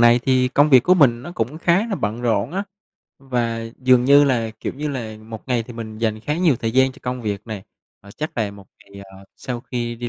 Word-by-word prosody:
này 120 Hz, 0 st, +6 dB
thì 130 Hz, -1 st, +2 dB
công 145 Hz, +3 st, +3 dB
việc 130 Hz, -3 st, +7 dB
của 180 Hz, -, +5 dB
mình 125 Hz, -8 st, +4 dB
nó 175 Hz, -, -8 dB
cũng 130 Hz, +1 st, -3 dB
khá 175 Hz, +6 st, +2 dB
là 210 Hz, -, -1 dB
bận 110 Hz, -, -3 dB
rộn 115 Hz, +1 st, 0 dB
á, 195 Hz, +2 st, -1 dB, 0.6 s
và 120 Hz, -4 st, -2 dB, 0.2 s
dường 125 Hz, -1 st, +4 dB
như 140 Hz, +2 st, +7 dB
là, 120 Hz, -5 st, 0 dB
kiểu -, -, -3 dB
như 150 Hz, +2 st, -3 dB
là, 115 Hz, -6 st, -5 dB
một 110 Hz, +2 st, -10 dB
ngày 125 Hz, -2 st, +1 dB
thì 120 Hz, +2 st, -11 dB
mình 110 Hz, -2 st, -8 dB
dành 110 Hz, -1 st, -1 dB
khá 150 Hz, +7 st, -2 dB
nhiều 165 Hz, -8 st, +3 dB
thời 115 Hz, 0 st, -2 dB
gian 130 Hz, +1 st, +3 dB
cho 140 Hz, -, -17 dB
công 125 Hz, 0 st, -4 dB
việc 100 Hz, -3 st, -2 dB
nè. 110 Hz, -4 st, -6 dB, 0.4 s
À, 100 Hz, -, -15 dB
chắc 155 Hz, +9 st, -6 dB
là 105 Hz, -3 st, 0 dB
một 100 Hz, -1 st, -14 dB
ngày, 100 Hz, -1 st, -13 dB
ờ, 95 Hz, 0 st, -15 dB
sau 125 Hz, -2 st, -5 dB
khi 120 Hz, -1 st, -4 dB
đi 120 Hz, +1 st, -5 dB
120 Hz, 250 wpm, -21 LUFS, 110-135 Hz, 0.6 s, việc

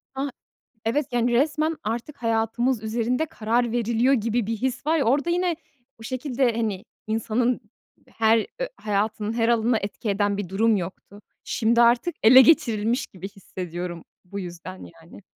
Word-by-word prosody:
A! 275 Hz, +1 st, -2 dB, 0.6 s
Evet, 265 Hz, +6 st, 0 dB
yani, 240 Hz, 0 st, +1 dB
resmen 305 Hz, +5 st, +1 dB
artık 240 Hz, +6 st, -4 dB
hayatımız 230 Hz, +1 st, 0 dB
üzerinde 235 Hz, +6 st, -1 dB
karar 235 Hz, -2 st, 0 dB
veriliyor 235 Hz, +2 st, +2 dB
gibi 230 Hz, -1 st, 0 dB
bir 225 Hz, +1 st, -2 dB
his 255 Hz, +4 st, -3 dB
var 320 Hz, +1 st, +3 dB
ya, 280 Hz, -, +1 dB
orada 285 Hz, +8 st, +2 dB
yine 350 Hz, -1 st, +1 dB, 0.4 s
o -, -, -10 dB
şekilde, 255 Hz, +1 st, 0 dB
hani, 215 Hz, -4 st, -2 dB, 0.2 s
insanın 225 Hz, +3 st, 0 dB, 0.5 s
her 225 Hz, -1 st, +2 dB
ö -, -, -1 dB
hayatının 210 Hz, +1 st, -1 dB
her 230 Hz, 0 st, +1 dB
alanına 235 Hz, 0 st, +2 dB
etki 205 Hz, +1 st, -4 dB
eden 200 Hz, 0 st, +1 dB
bir 200 Hz, -3 st, -4 dB
durum 215 Hz, +4 st, +2 dB
yoktu. 195 Hz, +2 st, -7 dB, 0.2 s
Şimdi 230 Hz, +1 st, +1 dB
artık 240 Hz, +9 st, +3 dB
ele 250 Hz, +4 st, +9 dB
geçirilmiş 235 Hz, -4 st, +2 dB
gibi 185 Hz, +1 st, -9 dB
hissediyorum. 180 Hz, -3 st, -7 dB, 0.2 s
Bu 200 Hz, +2 st, -6 dB
yüzden 170 Hz, -, -8 dB, 0.3 s
yani. 170 Hz, +5 st, -14 dB
230 Hz, 150 wpm, -24 LUFS, 210-250 Hz, 0.6 s, ele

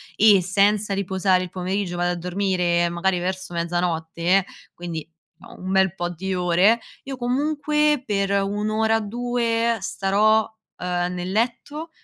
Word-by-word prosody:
e 205 Hz, -3 st, +6 dB
senza 200 Hz, +2 st, +2 dB
riposare 190 Hz, -1 st, +1 dB
il 180 Hz, -, -8 dB
pomeriggio 185 Hz, 0 st, -2 dB
vado 175 Hz, 0 st, 0 dB
a -, -, -4 dB
dormire 180 Hz, -1 st, 0 dB
magari 175 Hz, +1 st, 0 dB
verso 185 Hz, 0 st, -4 dB
mezzanotte, 170 Hz, +1 st, 0 dB, 0.3 s
quindi, 165 Hz, -3 st, -6 dB, 0.3 s
uhm, -, -, -14 dB
un 190 Hz, -, -2 dB
bel 190 Hz, -2 st, +3 dB
po' 175 Hz, -1 st, -3 dB
di 190 Hz, +3 st, -4 dB
ore, 180 Hz, +6 st, +3 dB, 0.2 s
io 270 Hz, -1 st, -6 dB
comunque 295 Hz, +3 st, +1 dB
per 200 Hz, -4 st, -1 dB
1 200 Hz, +2 st, 0 dB
ora, 220 Hz, +1 st, +2 dB
2 230 Hz, +1 st, 0 dB
starò, 210 Hz, +4 st, +2 dB, 0.3 s
ehm, 180 Hz, 0 st, -2 dB
nel 180 Hz, +1 st, -4 dB
letto 255 Hz, +8 st, -2 dB
195 Hz, 140 wpm, -23 LUFS, 180-220 Hz, 0.3 s, e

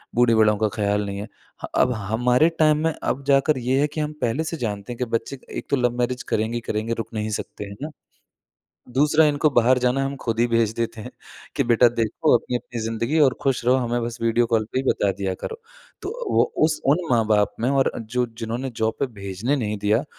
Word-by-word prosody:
बूढ़े-बड़ों 110 Hz, -3 st, +4 dB
का 110 Hz, 0 st, +1 dB
ख़्याल 105 Hz, -1 st, 0 dB
नहीं 100 Hz, 0 st, -4 dB
है। 105 Hz, -, -6 dB, 0.4 s
ह -, -, -8 dB
अब 125 Hz, -, +3 dB
हमारे 120 Hz, -, +2 dB
टाइम 155 Hz, -1 st, +5 dB
में 160 Hz, -1 st, +1 dB
अब 140 Hz, +2 st, -1 dB
जाकर 140 Hz, +1 st, +3 dB
ये 130 Hz, +3 st, +1 dB
है 150 Hz, -, +3 dB
कि 150 Hz, +1 st, -4 dB
हम 150 Hz, 0 st, -3 dB
पहले 125 Hz, +7 st, 0 dB
से 165 Hz, 0 st, -4 dB
जानते 105 Hz, -1 st, -4 dB
हैं, -, -, -11 dB
कि 125 Hz, -, 0 dB
बच्चे 115 Hz, +3 st, -3 dB, 0.2 s
एक -, -, -7 dB
तो -, -, +5 dB
लव-मैरेज 125 Hz, 0 st, 0 dB
करेंगे 110 Hz, +2 st, 0 dB
ही 120 Hz, -, -2 dB
करेंगे, 110 Hz, +1 st, -2 dB
रुक 115 Hz, -2 st, -4 dB
नहीं 110 Hz, 0 st, -2 dB
सकते -, -, -7 dB
है 100 Hz, -, -8 dB
ना। 155 Hz, -, -3 dB, 1.1 s
दूसरा 150 Hz, +3 st, +4 dB
इनको 150 Hz, +1 st, +2 dB
बाहर 125 Hz, 0 st, +4 dB
जाना 125 Hz, +2 st, +1 dB
है, 135 Hz, -, 0 dB
हम 140 Hz, -, -4 dB
ख़ुद 115 Hz, 0 st, -1 dB
ही 120 Hz, -, +4 dB
भेज 115 Hz, -2 st, +2 dB
देते 115 Hz, -1 st, -3 dB
हैं, -, -, -8 dB, 0.5 s
कि -, -, +2 dB
बेटा 120 Hz, +1 st, +5 dB
देखो 115 Hz, 0 st, +1 dB
अपनी-अपनी 120 Hz, 0 st, -4 dB
ज़िंदगी 115 Hz, +5 st, -2 dB
है 160 Hz, -, +4 dB
और 130 Hz, -3 st, +4 dB
खुश 135 Hz, -3 st, 0 dB
रहो, 125 Hz, -, +5 dB
हमें 120 Hz, -1 st, -1 dB
बस 120 Hz, +1 st, -4 dB
वीडियो 115 Hz, +1 st, +2 dB
कॉल 115 Hz, -2 st, +1 dB
पे -, -, 0 dB
ही 130 Hz, -, 0 dB
बता 100 Hz, -, +1 dB
दिया 95 Hz, -1 st, -3 dB
करो। 455 Hz, -, -6 dB, 0.4 s
तो 385 Hz, -, -4 dB, 0.3 s
वो -, -, +6 dB, 0.2 s
उस 155 Hz, 0 st, +1 dB
उन 145 Hz, +5 st, +4 dB
माँ 115 Hz, -2 st, +3 dB
बाप 105 Hz, -1 st, +2 dB
में 120 Hz, -, +1 dB
और 135 Hz, -1 st, +2 dB
जो 120 Hz, +2 st, -1 dB
जिन्होंने 120 Hz, +3 st, -3 dB
जॉब 110 Hz, 0 st, 0 dB
पर 140 Hz, -, +2 dB
भेजने 100 Hz, +7 st, -2 dB
नहीं 105 Hz, -4 st, -2 dB
दिया 105 Hz, +7 st, +1 dB
120 Hz, 230 wpm, -23 LUFS, 110-135 Hz, 1.1 s, वो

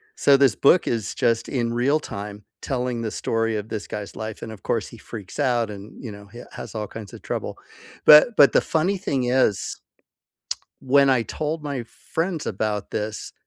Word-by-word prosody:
So 140 Hz, -1 st, +5 dB
this 135 Hz, -7 st, +4 dB
book 170 Hz, +5 st, +4 dB
is 115 Hz, -4 st, -1 dB
just 115 Hz, -1 st, +1 dB
in 120 Hz, -3 st, -1 dB
real 135 Hz, +6 st, +2 dB
time 105 Hz, -4 st, -7 dB, 0.2 s
telling 125 Hz, -2 st, -2 dB
the 110 Hz, -2 st, -3 dB
story 115 Hz, -1 st, -1 dB
of 105 Hz, +1 st, -6 dB
this 110 Hz, -2 st, -4 dB
guy's 105 Hz, -1 st, -6 dB
life, 110 Hz, 0 st, -6 dB
and 110 Hz, -, -6 dB
of 110 Hz, -, -11 dB
course, -, -, -1 dB
he -, -, -12 dB
freaks 105 Hz, -1 st, -9 dB
out 120 Hz, -5 st, +2 dB
and, 105 Hz, +4 st, -10 dB
you 115 Hz, -, -5 dB
know, 100 Hz, 0 st, -11 dB
he 120 Hz, +4 st, -11 dB
has -, -, -8 dB
all 105 Hz, -2 st, -3 dB
kinds 110 Hz, -3 st, -9 dB
of -, -, -10 dB
trouble, -, -, -4 dB, 0.5 s
but 150 Hz, +10 st, +9 dB
but 140 Hz, -, +8 dB
the -, -, +5 dB
funny 175 Hz, +5 st, 0 dB
thing 135 Hz, -8 st, -1 dB
is 120 Hz, -7 st, +1 dB, 1.0 s
when 140 Hz, +1 st, +4 dB
I 130 Hz, -3 st, +4 dB
told 155 Hz, +5 st, -3 dB
my 140 Hz, -4 st, -3 dB
friends 165 Hz, +7 st, -4 dB
about 105 Hz, 0 st, -2 dB
this, 110 Hz, 0 st, -4 dB
120 Hz, 190 wpm, -24 LUFS, 105-140 Hz, 1.0 s, but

